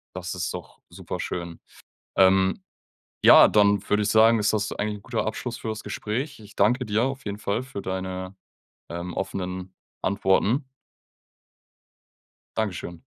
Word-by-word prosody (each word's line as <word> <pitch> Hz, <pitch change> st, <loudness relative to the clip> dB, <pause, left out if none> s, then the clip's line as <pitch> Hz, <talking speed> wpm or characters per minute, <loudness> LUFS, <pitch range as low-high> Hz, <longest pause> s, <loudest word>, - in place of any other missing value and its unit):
Das 90 Hz, 0 st, -4 dB
ist 90 Hz, -, -3 dB
doch -, -, -9 dB
superschön. 85 Hz, -1 st, -5 dB, 0.6 s
Ähm, 95 Hz, -, +4 dB, 0.6 s
ja, -, -, +9 dB
dann 100 Hz, -1 st, +3 dB
würde 105 Hz, 0 st, +3 dB
ich 100 Hz, -, 0 dB
sagen, 110 Hz, +1 st, +6 dB
ist 105 Hz, -, +2 dB
das 110 Hz, -1 st, 0 dB
eigentlich 105 Hz, 0 st, -2 dB
'n -, -, -20 dB
guter 115 Hz, +1 st, -2 dB
Abschluss 115 Hz, +2 st, -4 dB
für 110 Hz, -, -5 dB
das 110 Hz, 0 st, -4 dB
Gespräch. 130 Hz, +7 st, -4 dB
Ich 105 Hz, 0 st, -15 dB
danke 125 Hz, 0 st, +2 dB
dir 105 Hz, +2 st, +1 dB
auf 135 Hz, +1 st, -4 dB
jeden 105 Hz, -1 st, -4 dB
Fall 105 Hz, +3 st, -2 dB
für 130 Hz, -6 st, -7 dB
deine, 95 Hz, 0 st, -4 dB, 0.5 s
ähm, 85 Hz, +1 st, -5 dB
offenen 95 Hz, -1 st, -4 dB, 0.3 s
Antworten. 100 Hz, +7 st, +2 dB, 1.9 s
Dankeschön. 90 Hz, -5 st, -3 dB
100 Hz, 140 wpm, -25 LUFS, 95-110 Hz, 1.9 s, ja